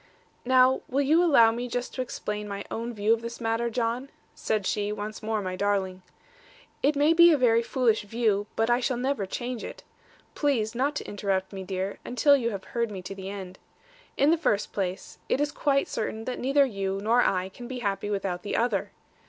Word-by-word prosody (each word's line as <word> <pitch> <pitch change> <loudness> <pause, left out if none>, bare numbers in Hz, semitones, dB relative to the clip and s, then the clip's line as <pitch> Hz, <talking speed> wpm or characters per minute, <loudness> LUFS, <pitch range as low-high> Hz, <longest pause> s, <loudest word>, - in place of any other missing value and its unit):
'Now, 255 +1 +4
will 275 +2 +1
you 315 +5 +4
allow 235 -10 +6
me 240 +2 -4
just 245 +1 -4
to 255 - -2
explain 210 -4 -4
my 200 0 -5
own 230 +1 -3
view 215 0 +2
of 230 - -1
this 235 0 -7
matter, 230 0 0
John?' 235 +3 -2 0.2
said 215 -3 -2
she, 205 +1 -1
once 210 +1 -5
more 215 -1 -2
my 185 -1 -3
darling. 190 -2 -1 0.8
'It 290 +2 +2
may 295 +3 +4
be 340 +1 +8
a 305 - +4
very 230 -3 +4
foolish 235 -2 +1
view, 205 -1 0
but 225 - +1
I 240 +1 +3
shall 255 -1 -1
never 250 -5 -1
change 245 +3 -4
it. - - -8 0.5
Please 240 -7 0
not 275 +5 0
to - - -4
interrupt 195 -1 -2
me, 190 -1 -5
dear, 190 +1 -4
until 280 +4 +4
you 240 -4 0
have 200 -4 -5
heard 235 -1 -2
me 190 -3 -7
to 195 - -6
the 190 0 -7
end. 190 -2 -8 0.6
In 285 +3 +4
the 335 - +3
first 210 -10 0
place, 185 -2 -4
it - - +2
is 290 0 0
quite 275 -2 +1
certain 220 0 -4
that 255 - -4
neither 275 +2 +3
you 195 -5 -3
nor 230 +4 +3
I 185 -4 +1
can 240 +5 -10
be 260 0 -5
happy 200 -1 -2
without 195 -3 -2
the 205 - -3
other. 240 +1 0
225 Hz, 210 wpm, -27 LUFS, 200-255 Hz, 0.8 s, be